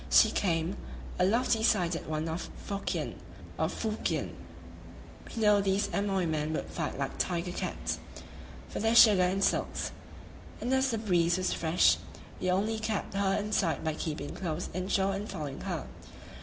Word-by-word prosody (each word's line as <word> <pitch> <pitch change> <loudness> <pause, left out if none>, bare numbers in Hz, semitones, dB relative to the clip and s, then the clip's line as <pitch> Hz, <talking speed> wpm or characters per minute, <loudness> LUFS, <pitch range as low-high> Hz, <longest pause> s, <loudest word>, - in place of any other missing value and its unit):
She - - +6
came, 170 -1 0 0.4
a 180 - +5
lofty 225 +2 +2
sided 180 -7 +1
one 155 +1 -2
of 165 +2 -4 0.2
Fokien 200 -1 -3 0.4
[Fuhkien]. 215 - -1 1.0
We 225 - -5
knew 210 -1 +5
these 195 0 +1
Amoy 195 -2 +1
men 155 -1 -1
would - - -2
fight 160 -3 -3
like 135 -1 -3
tiger 175 0 -1
cats - - -3 0.7
for - - -5
their 225 +2 +2
sugar 210 -5 +8
and 185 +2 +2
silks; - - 0 0.7
and 250 - -1
as 265 0 +3
the 230 - 0
breeze 175 -5 +2
was 185 0 0
fresh, 160 - +4 0.4
we 185 - -1
only 210 +4 +1
kept 220 -3 -2
her 195 -1 +1
in 210 +1 -3
sight 170 -7 +1
by 160 -1 0
keeping 150 -2 -4
close 175 -2 -3
inshore 190 +2 +1
and 200 +2 -4
following 145 -3 -5
her. - - -3
185 Hz, 155 wpm, -30 LUFS, 165-210 Hz, 1.0 s, sugar